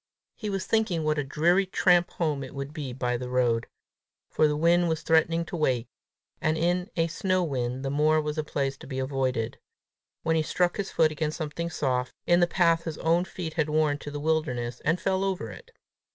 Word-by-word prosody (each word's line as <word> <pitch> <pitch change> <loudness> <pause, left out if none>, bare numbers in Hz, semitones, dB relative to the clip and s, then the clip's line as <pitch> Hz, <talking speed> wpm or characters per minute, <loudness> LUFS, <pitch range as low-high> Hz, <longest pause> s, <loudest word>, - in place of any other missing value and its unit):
He 215 - -5
was 195 -1 -2
thinking 215 -8 +1
what 155 -1 +1
a - - 0
dreary 170 +8 +2
tramp 175 -1 +3
home 150 -5 -1
it 135 +1 -9
would 140 +1 -5
be 145 -5 -5
by 125 -1 -1
the 125 +1 -6
road 120 -2 +1 0.6
for 155 - +4
the 150 0 0
wind 170 +2 +3
was 160 -1 -1
threatening 165 +1 +3
to 175 - -6
wake, 130 -7 +1 0.6
and 155 +1 +1
in 175 +3 0
a 165 - +3
snow 185 +2 0
wind 130 -3 -2
the 135 - -1
moor 155 +2 +3
was 150 0 -2
a - - 0
place 135 -2 -2
to - - -12
be 130 -1 -5
avoided 130 -4 -1 0.6
when 160 0 +2
he 160 - +3
struck 175 +3 0
his 200 -2 -2
foot 155 -1 +3
against 155 0 -2
something 170 +1 -3
soft, 130 -6 -1
in 175 0 +4
the 175 - +4
path 170 -2 +2
his 160 -3 -4
own 170 +2 +2
feet 170 -4 -6
had 160 -2 0
worn 150 -1 +2
to 145 - -7
the 145 0 -5
wilderness, 130 -6 -1
and 165 +4 +1
fell 190 +2 0
over 185 - -2
it. 95 - -12
155 Hz, 210 wpm, -27 LUFS, 135-170 Hz, 0.6 s, for